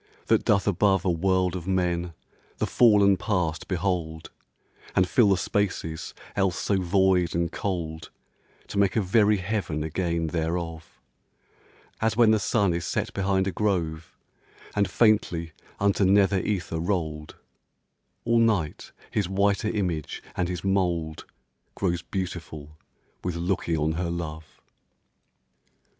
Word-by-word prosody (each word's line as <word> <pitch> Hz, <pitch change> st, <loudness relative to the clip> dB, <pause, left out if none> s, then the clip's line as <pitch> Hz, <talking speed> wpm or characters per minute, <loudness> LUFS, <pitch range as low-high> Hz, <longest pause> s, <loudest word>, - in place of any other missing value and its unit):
that -, -, +3 dB
doth 100 Hz, -1 st, +2 dB
above 95 Hz, -1 st, +2 dB
A 90 Hz, -, +3 dB
world 95 Hz, +1 st, +1 dB
of 90 Hz, -1 st, -6 dB
men, 90 Hz, -2 st, 0 dB, 0.4 s
the -, -, 0 dB
sunken 105 Hz, -5 st, +5 dB
Past 90 Hz, -8 st, -1 dB
behold, 85 Hz, -4 st, -2 dB, 0.6 s
And 90 Hz, -, +4 dB
colour 105 Hz, -5 st, +4 dB
spaces 85 Hz, -5 st, -2 dB, 0.2 s
else 95 Hz, -3 st, 0 dB
too 100 Hz, -2 st, +1 dB
void 95 Hz, -1 st, +2 dB
and 85 Hz, -1 st, 0 dB
cold, 80 Hz, -5 st, -4 dB, 0.6 s
To 100 Hz, -, -2 dB
make 100 Hz, -2 st, +2 dB
a -, -, +3 dB
very 105 Hz, +2 st, +3 dB
heaven 95 Hz, -6 st, -2 dB
again 85 Hz, +1 st, -1 dB
thereof; 80 Hz, 0 st, -3 dB, 1.0 s
As 110 Hz, -1 st, +1 dB
when 115 Hz, -2 st, +6 dB
the 110 Hz, -, +3 dB
sun 100 Hz, -2 st, +1 dB
is 85 Hz, 0 st, -2 dB
set -, -, -2 dB
behind 95 Hz, -1 st, +1 dB
a 95 Hz, -, -1 dB
grove, 85 Hz, -6 st, -2 dB, 0.6 s
And 100 Hz, -1 st, +2 dB
faintly 95 Hz, -7 st, +2 dB, 0.3 s
unto 100 Hz, 0 st, +2 dB
nether 95 Hz, 0 st, +4 dB
ether 90 Hz, -4 st, -2 dB
rolled, 80 Hz, -4 st, -3 dB, 0.9 s
All 115 Hz, 0 st, +3 dB
night, 105 Hz, -10 st, 0 dB, 0.2 s
his 100 Hz, -4 st, -1 dB
whiter 100 Hz, +2 st, +1 dB
image 90 Hz, -8 st, -3 dB
and 90 Hz, -1 st, -1 dB
his 90 Hz, -2 st, -4 dB
mould 90 Hz, -5 st, -1 dB, 0.5 s
Grows 90 Hz, -3 st, -1 dB
beautiful 80 Hz, -5 st, -6 dB, 0.5 s
with 90 Hz, -1 st, -2 dB
looking 85 Hz, -1 st, -1 dB
on 75 Hz, +1 st, +1 dB
her 85 Hz, +2 st, -2 dB
love. 80 Hz, -2 st, -6 dB
90 Hz, 130 wpm, -26 LUFS, 85-100 Hz, 1.0 s, when